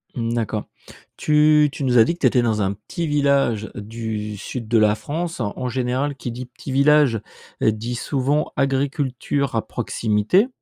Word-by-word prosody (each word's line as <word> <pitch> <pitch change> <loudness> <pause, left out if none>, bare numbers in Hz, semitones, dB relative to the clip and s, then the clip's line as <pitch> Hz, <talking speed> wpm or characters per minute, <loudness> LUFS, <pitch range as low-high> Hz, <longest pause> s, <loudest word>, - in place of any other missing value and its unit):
Mmh, 115 -1 -2
d'accord. 110 -2 -2 0.5
Tu 150 0 +4
tu 140 - -6
nous 125 -2 +3
as 115 - +9
dit 170 - 0
que 175 - -12
tu - - +4
étais 125 - +3
dans 110 -3 0
un 95 0 0
petit 110 - -5
village 140 -7 +1
du 105 -1 -5
sud 115 +3 -6
de 115 +1 +3
la 105 -1 +4
France. 165 +6 -4
En 120 +3 -3
général, 130 +3 -1
qui 125 -2 -5
dit: 125 +2 -6
«petit 135 - -7
village», 140 -3 +4 0.4
dit 110 +3 0
souvent: 140 +4 0
«agriculture 135 -1 -1
à 110 - -1
proximité». 110 - +1
125 Hz, 170 wpm, -22 LUFS, 110-145 Hz, 0.5 s, as